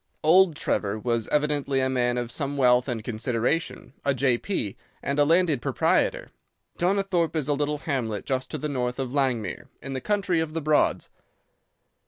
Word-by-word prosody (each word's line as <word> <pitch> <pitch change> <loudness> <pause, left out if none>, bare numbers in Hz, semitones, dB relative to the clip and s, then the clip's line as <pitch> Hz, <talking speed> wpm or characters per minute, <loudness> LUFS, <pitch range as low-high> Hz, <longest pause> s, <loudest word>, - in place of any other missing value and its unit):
"Old 170 +1 +5
Trevor 105 -7 -1
was 115 0 -1
evidently 145 -2 0
a 130 - +2
man 125 -2 0
of 120 -1 -3
some 140 +3 -2
wealth 125 -1 +4
and 120 -4 -3
consideration, 120 +7 -2
a 140 -1 +1
J.P. 125 - 0 0.3
and 140 +1 -1
a 145 - +5
landed 165 -4 +3
proprietor. - - +1 0.5
Donnithorpe 180 -2 +1
is 150 -4 -1
a 145 - +2
little 145 +1 -1
hamlet 125 - -3
just 130 -1 -2
to - - -4
the 150 - -3
north 125 -3 -2
of 130 -2 -4
Langmere, 130 -7 -1
in 135 - -7
the 130 - -3
country 195 -5 0
of 160 -1 -3
the 165 - -1
Broads. 150 0 +2
140 Hz, 170 wpm, -25 LUFS, 125-155 Hz, 0.5 s, Old